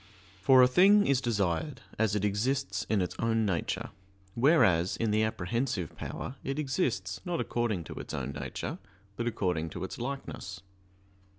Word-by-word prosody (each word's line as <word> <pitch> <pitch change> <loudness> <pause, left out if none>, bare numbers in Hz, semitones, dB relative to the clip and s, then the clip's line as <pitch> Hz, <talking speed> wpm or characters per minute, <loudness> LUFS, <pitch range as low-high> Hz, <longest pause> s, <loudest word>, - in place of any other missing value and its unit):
For 130 +5 +7
a - - +7
thing 200 +9 +6
is 135 -1 +2
desired 90 - -1 0.2
as 110 -2 +2
it 105 0 +1
exists 125 +7 -1
in 105 -4 +2
its 90 - -4
own 115 -1 +2
nature, 90 -5 -2 0.4
whereas 100 - +4
in 115 -2 0
the 110 +1 +3
apprehensive 110 - -1
power 135 - -6
it 135 +1 -3
exists 105 -9 -1
not 175 -1 -2
according 115 -7 -1
to - - -8
its - - -7
own - - -3
nature, - - -5 0.4
but 120 +2 -2
according 90 -8 -1
to 90 +3 -6
its 95 - -6
likeness. 120 -6 -5
110 Hz, 160 wpm, -30 LUFS, 95-130 Hz, 0.4 s, For